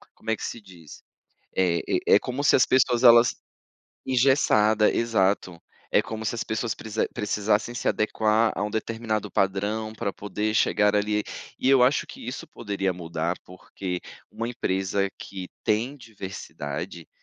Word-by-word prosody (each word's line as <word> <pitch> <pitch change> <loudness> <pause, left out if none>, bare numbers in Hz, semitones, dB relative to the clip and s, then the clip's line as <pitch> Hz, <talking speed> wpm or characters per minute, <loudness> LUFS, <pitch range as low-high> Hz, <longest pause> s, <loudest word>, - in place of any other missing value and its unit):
como - - -9
é 110 - +2
que - - -8
se 115 - -6
diz? 90 -6 -14 0.6
É 90 -2 +2
é - - -1 0.2
é - - +6
como 130 +3 -4
se 145 - +5
as 130 - +5
pessoas 125 -1 +3
elas 120 0 +7 0.7
engessada, 115 -5 +4
exato. 95 -6 0 0.3
É - - +4
como 110 0 -6
se 115 - -1
as 115 - -3
pessoas 110 +1 -2
precisa 110 0 -2
precisassem 105 +2 0
se - - -1
adequar 110 +1 +2
a - - -2
um 105 - -2
determinado 110 -1 -2
padrão 105 +3 0
pra 100 -2 -3
poder 105 +2 -3
chegar 105 -1 +3
ali, 105 0 +1 0.3
e - - +1
eu 135 -2 +6
acho 130 +4 +3
que - - -11
isso 125 - -5
poderia 100 -4 -2
mudar, 85 0 -3
porque 90 0 -6 0.3
uma 115 - -4
empresa 95 -3 -1
que 95 -2 -7 0.2
tem 115 +6 0
diversidade, 95 - -7
105 Hz, 155 wpm, -25 LUFS, 95-115 Hz, 0.7 s, elas